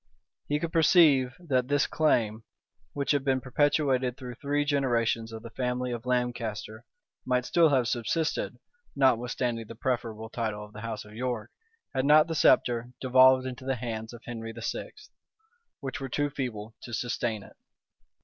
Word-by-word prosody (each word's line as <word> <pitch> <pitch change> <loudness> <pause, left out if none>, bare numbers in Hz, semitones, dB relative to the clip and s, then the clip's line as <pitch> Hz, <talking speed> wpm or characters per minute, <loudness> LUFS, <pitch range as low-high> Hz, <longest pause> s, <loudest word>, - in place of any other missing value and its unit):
He 150 0 +1
could 165 +1 -4
perceive 150 -6 +5
that 130 -8 0
this 145 +1 +2
claim, 115 -8 +1 0.5
which 140 -1 0
had 145 -2 +1
been 135 -1 +2
perpetuated 135 -1 +1
through 125 -2 -7
three 145 +3 -1
generations 120 -5 +1
of 110 0 -8
the 115 - -9
family 125 +1 -2
of 120 +1 -5
Lancaster, 120 -3 -2 0.4
might 125 -1 0
still 165 +2 +4
have 130 -4 +2
subsisted, 130 +7 -1 0.4
notwithstanding 120 -3 +1
the 115 - -9
preferable 115 -2 -3
title 110 -3 -3
of 105 - -17
the 105 - -9
house 110 -2 -5
of 105 - -14
York, 120 -1 -3 0.4
had 130 0 0
not 150 +1 +7
the 165 - -4
sceptre 120 -5 +3
devolved 130 0 +5
into 130 0 -6
the 135 0 -1
hands 110 -2 -5
of 120 -1 -12
Henry 115 -1 -6
VI., 115 0 -4 0.9
which 140 0 -5
were 135 - -4
too 145 +3 -1
feeble 115 -6 -5
to 120 - -5
sustain 115 -3 -2
it. - - -16
125 Hz, 160 wpm, -28 LUFS, 115-135 Hz, 0.9 s, not